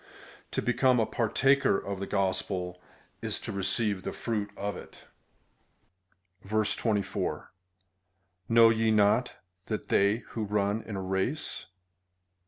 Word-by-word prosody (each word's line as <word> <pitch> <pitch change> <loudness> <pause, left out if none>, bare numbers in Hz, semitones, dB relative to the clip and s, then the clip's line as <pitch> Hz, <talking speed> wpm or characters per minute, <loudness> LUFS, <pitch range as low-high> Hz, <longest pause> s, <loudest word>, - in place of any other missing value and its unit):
To - - -2
become 125 0 +3
a 110 - +3
partaker 135 +1 +2
of 100 -1 -5
the 100 - -4
gospel 95 -2 -1 0.4
is - - -2
to - - -5
receive 100 0 0
the - - -4
fruit 105 -3 -3
of 100 +1 -3
it. - - -12 1.5
24. 110 -1 -1 1.0
Know 115 0 +7
ye 110 0 +1
not, 105 +3 +3 0.3
that 110 - -4
they 100 +4 +3
luho 110 -2 -2
run 105 +1 +1
in 110 - -7
a 95 - -3
race. 95 +11 -1
105 Hz, 120 wpm, -29 LUFS, 100-115 Hz, 1.5 s, Know